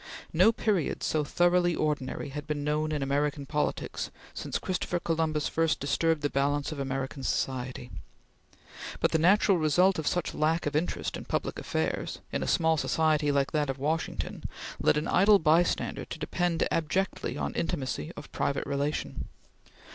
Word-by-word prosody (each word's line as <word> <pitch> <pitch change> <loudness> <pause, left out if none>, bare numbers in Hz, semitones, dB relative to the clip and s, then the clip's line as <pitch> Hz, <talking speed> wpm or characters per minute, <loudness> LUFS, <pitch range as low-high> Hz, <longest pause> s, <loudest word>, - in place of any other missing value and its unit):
No 225 - +6
period 210 -7 0
so 155 -1 +1
thoroughly 175 +2 +3
ordinary 145 -3 -2
had 145 +1 -6
been 150 -1 -2
known 150 +1 0
in 150 -2 -1
American 145 +1 0
politics 150 +2 -2 0.2
since - - -3
Christopher 180 -1 -2
Columbus 160 -3 0
first 165 -1 +1
disturbed 160 +2 +1
the 145 - +2
balance 145 +2 0
of 155 - -5
American 135 0 -3
society; 130 -1 -2 1.1
but - - +2
the 160 - +2
natural 190 +2 +4
result 175 +4 +3
of 155 - -3
such 175 -2 0
lack 160 +2 +1
of 145 0 -2
interest 160 +4 -1
in - - -8
public - - -2
affairs, 80 0 -2
in - - -1
a - - -2
small 160 -1 +3
society 155 -1 +2
like 140 -1 +1
that 150 -3 0
of 135 - -2
Washington, 155 +4 -2 0.4
led - - +4
an 150 - -1
idle 205 +2 +6
bystander 165 0 +2
to - - -7
depend 170 +1 0
abjectly 180 +4 -1
on - - -2
intimacy 135 - -2
of - - -9
private 140 - -1
relation. 140 +2 -2
155 Hz, 160 wpm, -29 LUFS, 145-165 Hz, 1.1 s, No